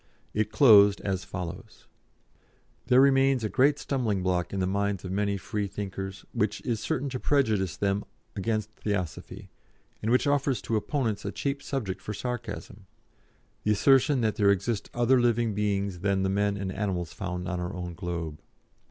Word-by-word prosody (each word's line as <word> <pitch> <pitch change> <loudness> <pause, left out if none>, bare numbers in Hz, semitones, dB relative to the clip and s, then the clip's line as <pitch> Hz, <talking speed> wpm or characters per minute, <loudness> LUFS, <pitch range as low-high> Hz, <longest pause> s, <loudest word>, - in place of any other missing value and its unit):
It 105 0 0
closed 105 -7 +7
as 95 -2 -2
follows: 90 +3 -7 1.0
"There 125 0 +6
remains 135 -2 +4
a 110 - 0
great 140 +5 +4
stumblingblock 95 -11 -1
in 100 - -2
the 95 - +1
minds 100 0 -1
of 90 - -5
many 100 +1 0
Freethinkers 95 -1 -5
which - - 0
is 115 -3 -2
certain 130 +5 -2
to 130 -1 -4
prejudice 110 - +1
them 100 0 0 0.3
against 110 +1 -2
Theosophy, 100 -7 -4 0.5
and 110 - -1
which 125 +4 +3
offers 140 -2 +1
to 115 - -1
opponents 110 -1 -1
a - - -3
cheap 140 0 -2
subject 110 -9 -3
for 105 - -5
sarcasm 110 -4 -6 0.8
the 105 - +3
assertion 135 +5 +4
that 110 -2 0
there 100 -2 +4
exist 100 +3 0
other 120 +1 +4
living 120 -2 +2
beings 100 -2 -1
than 100 0 +1
the 95 - +1
men 100 +1 +1
and 95 -1 -3
animals 95 -3 -3
found 90 -1 -4
on 90 -1 -2
our 90 +3 -4
own 90 -1 -5
globe. 85 -3 -5
105 Hz, 160 wpm, -27 LUFS, 95-120 Hz, 1.0 s, closed